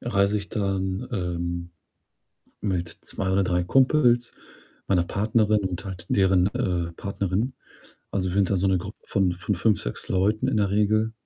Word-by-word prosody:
reise 100 -2 +1
ich 100 - -8
dann, 95 +1 -2
ähm, 85 -3 -3 0.9
mit 90 -4 -1
2 95 +2 -4
oder 95 +1 +3
3 90 -1 +1
Kumpels, 125 +1 +3 0.5
meiner 90 -3 +3
Partnerin 105 +2 +2
und 90 0 -4
halt 90 -2 -6
deren, 95 -2 +4
äh, 85 -2 -1
Partnerin. 100 +6 -2 0.6
Also, 95 -2 -1
wir 90 - -4
sind 100 -2 +3
da 100 - +2
so 95 +2 +1
'ne 95 -1 +3
Gruppe 100 +4 -7
von 95 -3 +1
von 90 +3 -2
5, 105 +1 +2
6 - - -5
Leuten 105 +6 +1
in 130 - +1
der 100 -2 +2
Regel 110 +2 +2
95 Hz, 165 wpm, -25 LUFS, 90-105 Hz, 0.9 s, deren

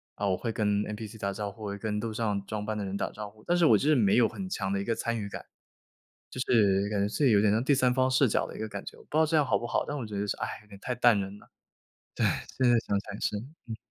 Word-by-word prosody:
啊， 100 - -1
我 95 -2 +1
会 115 - -3
跟 105 -2 +1
NPC 105 +1 -6
打 100 -1 -2
招 100 0 -4
呼， 110 +1 -12
我 105 - -3
会 100 - -4
跟 105 0 -2
路 115 0 -3
上 105 -3 -1
装 105 0 -4
扮 110 0 -2
的 105 - -3
人 95 0 -4
打 - - -1
招 105 -1 -7
呼， 110 0 -21
但 175 - +3
是 175 - +4
我 115 - +7
就 145 - +1
是 155 - +5
没 105 -7 +4
有 120 - +5
很 190 - -6
强 95 - -2
的 100 - 0
一 - - -2
个 115 +2 0
参 115 +1 -2
与 100 - -4
感。 - - -7 0.9
就 - - -8
是 100 -5 +3
感 105 -2 0
觉 100 - +1
自 140 +7 -1
己 130 - +6
有 105 - +5
点 105 0 +4
像 110 +3 +2
第 140 +1 +4
三 125 -1 +3
方 130 0 +2
视 130 0 +4
角 - - +1
的 - - -10
一 - - -9
个 110 - -3
感 100 -1 -6
觉， - - -9
我 - - -16
不 - - -37
知 155 - +1
道 160 - +6
这 160 +1 +1
样 150 - +3
好 - - +2
不 120 - -5
好， - - 0
但 145 - -3
我 130 - -4
觉 105 -2 -5
得 105 - -1
是， 100 - -2
哎， - - -2
有 - - -23
点 100 - -12
太 125 - -2
淡 120 -3 +4
人 100 +1 -6
了。 - - -19 0.7
对， - - 0 0.3
现 130 -2 +4
在 120 - +5
想 100 -1 +1
想 100 +1 -8
是。 105 - 0 0.3
嗯。 115 -2 -5
110 Hz, 365 characters per minute, -29 LUFS, 100-120 Hz, 0.9 s, 我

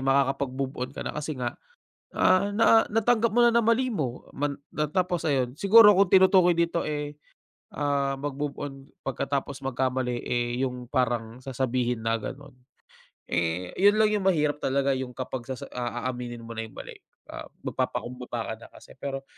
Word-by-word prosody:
makakapag-move 135 0 +1
on 130 +1 -3
ka - - -5
na - - -3
kasi 150 0 -4
nga, 125 -1 -4 0.5
ah, 200 +2 +3
na 225 +1 +5
natanggap 225 +1 +2
mo 240 - +2
na 235 -1 +5
na 235 - +4
mali 230 +3 +3
mo 145 - -3
man 145 0 -2
na 150 -1 -3
tapos 180 -1 0
ayun, 130 -4 0
siguro 210 +2 +7
kung 195 -1 +3
tinutukoy 185 -1 +6
dito 170 0 +1
eh, 150 -1 -4 0.6
ah, 140 -2 -1
mag-move 145 0 -3
on 145 -1 -4 0.3
pagkatapos 135 +1 -3
magkamali 130 -2 -1
eh 120 0 -1
yung 125 -2 -3
parang 120 -3 -1
sasabihin 125 -2 -2
na 115 0 0
ganun. 145 +5 -8 0.8
Eh, 85 +1 -2
yun 205 +2 +4
lang 215 - +5
yung 210 -2 0
mahirap 150 -6 +2
talaga 135 -1 0
yung 130 -1 -5
kapag 130 -1 -5
sasa 130 0 -6
ah, 120 0 -3
aaminin 120 -1 -5
mo 115 0 -8
na 115 - -3
yung 110 - -12
mali, - - -9 0.3
ah, - - -7 0.2
mag-papakumbaba 120 -2 -3
ka - - -4
na - - -11
kasi - - -16
pero 135 0 -5
135 Hz, 170 wpm, -26 LUFS, 125-170 Hz, 0.8 s, siguro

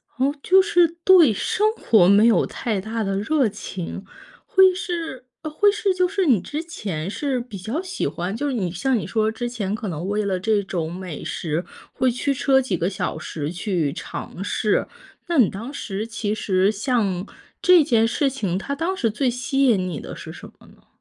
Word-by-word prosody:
哦， 270 +3 +1
就 380 +5 +5
是 365 -3 +4 0.2
对 355 -9 +7
生 420 - +1
活 215 - +4
没 200 +3 +6
有 235 - +4
太 215 -5 -3
大 220 +2 -3
的 195 -1 -1
热 270 +4 +2
情， 190 -2 -6 0.4
会 380 -1 +6
是 335 -8 -5 0.2
呃 310 - -4
会 410 +7 +4
是 410 -2 0
就 365 0 +2
是 390 0 0
你 245 - +4
之 300 - -5
前 195 - -5
是 265 +4 -2
比 240 -4 -8
较 220 - -3
喜 370 0 -3
欢， 180 +4 -4
就 290 +6 -2
是 280 - -1
你 190 -8 -1
像 250 +9 0
你 - - -3
说 220 -1 0
之 240 +2 -4
前 210 -4 -3
可 220 0 -5
能 170 +1 -4
为 205 +1 -1
了 190 -2 -1
这 210 +1 +1
种 170 -4 -3
美 180 -4 -7
食， 160 +1 -3 0.3
会 260 - +2
驱 250 +4 -1
车 270 0 +3
几 250 -8 -1
个 175 +2 0
小 185 -4 -3
时 155 -1 -5
去 180 -5 -1
尝 180 - -7
试， 210 +1 0 0.4
那 340 -1 0
你 240 -8 +5
当 225 +7 -7
时 215 -6 -4
其 225 -2 -2
实 195 -2 +1
像 205 -4 -1 0.3
这 360 -3 +6
件 230 -5 +3
事 275 +5 +1
情， 215 -10 -2
它 275 +8 -4
当 335 +6 -2
时 230 -8 +1
最 255 +4 0
吸 260 +3 0
引 200 -8 +3
你 170 -5 -4
的 - - -8
是 - - -9
什 - - -11
么 - - -18
呢？ - - -22
225 Hz, 220 characters per minute, -22 LUFS, 195-285 Hz, 0.4 s, 对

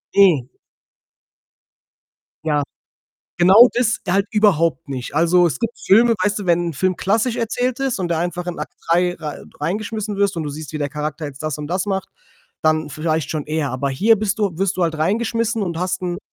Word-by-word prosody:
Hm. 170 -11 +5 1.9
Ja. 150 -2 +1 0.8
Genau 195 +8 +8
das 240 -2 +1
halt 195 +2 +2
überhaupt 170 -11 +2
nicht. 130 0 -5
Also, 170 +2 +4
es 140 -6 -2
gibt 230 0 -3
Filme, 230 +4 +5
weißt 205 +1 +1
du, 195 - -6
wenn 175 0 +2
'n - - -4
Film 185 +4 0
klassisch 225 +6 0
erzählt 245 +2 -1
ist 270 -4 -1
und 180 -2 -2
du 170 - 0
einfach 175 +1 -3
in 175 - -4
Akt - - -6
3 175 +1 +2
rei 155 -4 -7 0.2
reingeschmissen 210 +5 -3
wirst 200 -2 +1
und 165 - -2
du 150 - -4
siehst, 150 0 -8
wie 155 - -4
der 145 - -1
Charakter 150 +2 -4
jetzt 140 -1 -7
das 155 -2 -3
und 150 - -5
das 185 +5 -2
macht, 190 -1 -2 0.5
dann 155 0 +2
vielleicht 155 -1 -2
schon 155 -2 -3
eher. 155 -2 -1
Aber 130 +2 -2
hier 215 +12 +3
bist 210 0 -1
du 200 -6 -1
wirst 195 -1 0
du 185 - 0
halt 165 -2 0
reingeschmissen 225 +5 0
und 170 -4 -3
hast 185 +1 -2
'n 175 -1 -2
175 Hz, 200 wpm, -20 LUFS, 155-205 Hz, 1.9 s, Genau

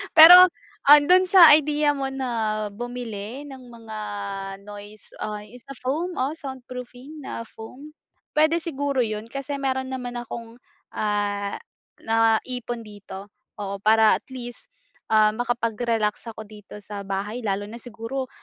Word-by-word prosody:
Pero, 355 +3 +11 0.4
ah, 295 +1 +10
do'n 370 +4 +5
sa 355 -4 +8
ideya 295 0 +1
mo 270 -1 -2
na 270 -1 -4 0.4
bumili 240 +1 -6
ng 260 -1 -11
mga 225 -2 -10 0.7
noise, 205 +1 -11
ah, 210 -1 -4
yung 245 +4 -14
sa 275 - -9
foam, 290 +9 -2
o 265 +3 -1
soundproofing 255 +1 -9
na - - -5
foam, 250 +7 -12 0.5
puwede 315 +2 +3
siguro 280 -4 -1
yun 215 0 -4
kasi 275 +3 -5
mayro'n 265 -1 -2
naman 250 -2 -5
akong, 230 0 -9 0.4
ah, 205 -1 -2 0.4
naipon 225 +2 0
dito, 200 -1 -10 0.3
oo, 200 -1 -4
para 220 0 +5
at - - -7
least, 245 - -8 0.4
ah, 215 -1 +4
makapag-relax 230 -2 -1
ako 220 0 -10
dito 210 -1 -12
sa 205 0 -8
bahay 200 +5 -4
lalo 205 0 -2
na 230 +2 -10
siguro, 245 +3 -6
240 Hz, 135 wpm, -24 LUFS, 215-270 Hz, 0.7 s, Pero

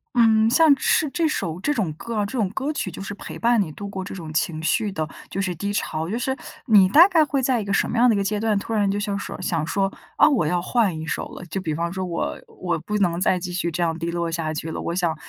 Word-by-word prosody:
嗯， 225 -1 +5
像 310 +3 +6
是 305 - +2
这 330 -2 +1
首 170 - -2
这 295 - 0
种 185 - -1
歌 230 +8 -6
啊 210 - +1
这 200 - -7
种 200 -4 +1
歌 275 +8 -3
曲 195 - -3
就 180 - -8
是 200 - -5
陪 - - -8
伴 235 -2 +3
你 160 -5 -3
度 200 +6 -7
过 190 -1 -5
这 195 - -7
种 160 -4 -7
情 155 0 -1
绪 210 +4 +1
的， 155 -3 -3 0.2
就 195 - -4
是 185 -2 -1
低 200 +5 -3
潮， 165 -6 -2
就 225 - -1
是 265 +2 -1 0.3
你 205 -6 +6
大 330 - +8
概 335 -5 +4
会 280 -2 0
在 250 -3 +2
一 - - -4
个 200 - -3
什 - - +1
么 240 - -2
样 245 +1 +5
的 220 - +4
一 - - 0
个 200 - +1
阶 205 +1 -1
段， 215 -1 +1
突 225 +3 -4
然 205 -2 +2
就 200 +1 0
想 200 -1 -2
说 - - -6
想 165 -4 0
说， 195 +1 0 0.2
啊， - - +6
我 240 - +2
要 175 +1 +1
换 195 -6 +1
一 160 - -5
首 - - -3
了。 - - -10
就 185 +3 -4
比 155 -4 -2
方 170 +2 -2
说 190 0 -3
我 170 -2 -2
我 175 -3 -3
不 210 +6 -3
能 175 -3 +1
再 185 - +3
继 180 0 -5
续 175 -1 -1
这 170 +1 -1
样 165 -1 0
低 170 +1 -2
落 170 -1 -2
下 165 -2 -2
去 160 +1 -4
了， - - -4
我 170 - -3
想 170 -3 0
195 Hz, 315 characters per minute, -23 LUFS, 170-225 Hz, 0.3 s, 大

